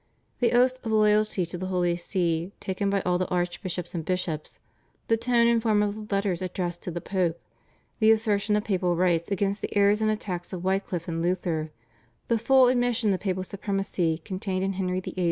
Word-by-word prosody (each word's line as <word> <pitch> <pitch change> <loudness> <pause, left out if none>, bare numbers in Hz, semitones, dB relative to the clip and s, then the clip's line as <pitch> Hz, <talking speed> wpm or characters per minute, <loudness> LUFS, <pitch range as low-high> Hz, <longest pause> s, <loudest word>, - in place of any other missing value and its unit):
The 245 - +2
oaths 255 +1 +3
of 225 - -3
loyalty 215 -3 +3
to 175 +1 -7
the 185 - -3
Holy 180 -2 +1
See 175 0 -1
taken 195 +1 -2
by 200 0 +1
all 180 0 0
the 185 - 0
archbishops 175 0 -3
and 170 -2 -3
bishops, 165 -3 -3 0.5
the 225 - +5
tone 235 +1 +2
and 235 -1 +3
form 215 -2 +3
of 205 -1 0
the 200 - -1
letters 195 -3 0
addressed 180 -1 -3
to - - -5
the 175 0 -4
Pope, 180 -4 -1 0.6
the 220 -1 +5
assertion 215 -2 +2
of 210 - +1
papal 180 -4 0
rights 170 -1 +1
against 200 +1 -1
the - - -3
errors 205 +1 +4
and 215 - +2
attacks 185 -4 -3
of 180 -1 -5
Wycliff 190 -2 -1
and 165 -1 -2
Luther, 170 -3 -1 0.6
the 230 -1 +2
full 260 +2 +5
admission 245 -4 +2
of 185 - -2
papal 185 -2 -2
supremacy 195 -4 -1
contained 185 +2 -3
in 195 0 0
Henry 185 -1 -1
VIII.' 185 - -8
190 Hz, 195 wpm, -26 LUFS, 175-210 Hz, 0.6 s, the